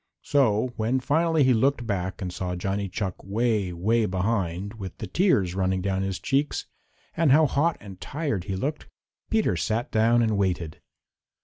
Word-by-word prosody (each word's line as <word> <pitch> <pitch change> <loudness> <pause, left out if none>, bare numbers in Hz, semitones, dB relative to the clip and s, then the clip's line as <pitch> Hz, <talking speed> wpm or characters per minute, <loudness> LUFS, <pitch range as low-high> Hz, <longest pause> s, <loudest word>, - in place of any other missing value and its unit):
So 125 -4 +2
when 115 +4 +1
finally 160 +3 +2
he 130 -1 +5
looked 120 +1 +1
back 95 -2 -3
and 90 -1 -4
saw 90 0 -3
Johnny 95 +2 -2
Chuck 95 -1 -4
way, 105 -2 0
way 110 +6 +1
behind, 95 0 -1
with 95 -2 -7
the 110 - -5
tears 100 - +2
running 95 0 0
down 95 0 -1
his 95 -1 -2
cheeks, 140 +2 -1 0.5
and 165 -4 +3
how 155 +3 +6
hot 150 +4 +1
and 95 -3 -11
tired 140 - -3
he 95 -2 -3
looked, 145 +10 -3 0.4
Peter 220 - +2
sat 110 +7 -1
down 115 +2 +3
and 110 -3 +1
waited. 85 -5 -1
105 Hz, 170 wpm, -26 LUFS, 95-130 Hz, 0.5 s, how